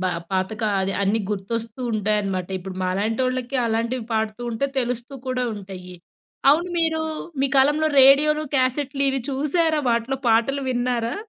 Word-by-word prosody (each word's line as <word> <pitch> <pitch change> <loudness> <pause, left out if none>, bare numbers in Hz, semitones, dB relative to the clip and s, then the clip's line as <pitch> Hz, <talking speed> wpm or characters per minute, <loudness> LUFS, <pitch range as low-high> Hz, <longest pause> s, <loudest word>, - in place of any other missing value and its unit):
బా 185 - +1 0.2
పాతక 190 +3 -2 0.2
అది 190 +1 -1
అన్నీ 205 +3 +1
గుర్తొస్తూ 225 +4 -4
ఉంటాయనమాట. 200 -3 -1
ఇప్పుడు 185 0 -8
మాలాంటోళ్ళకి 240 +7 -1
అలాంటివి 230 +2 -1
పాడుతూ 220 +1 -1
ఉంటే 235 +4 -1
తెలుస్తూ 245 +1 -3
కూడా 255 -1 -1
ఉంటాయి. 190 -3 -9 0.6
అవును, 335 +5 +2
మీరు 320 -1 +1 0.4
మీ 275 - +3
కాలంలో 295 +4 +4
రేడియోలు, 295 +3 +6
క్యాసెట్లు 270 +2 0
ఇవి 270 0 0
చూసారా? 305 +4 +1
వాటిలో 235 +3 0
పాటలు 235 +5 +2
విన్నారా? 245 -2 -1
240 Hz, 135 wpm, -23 LUFS, 215-275 Hz, 0.6 s, రేడియోలు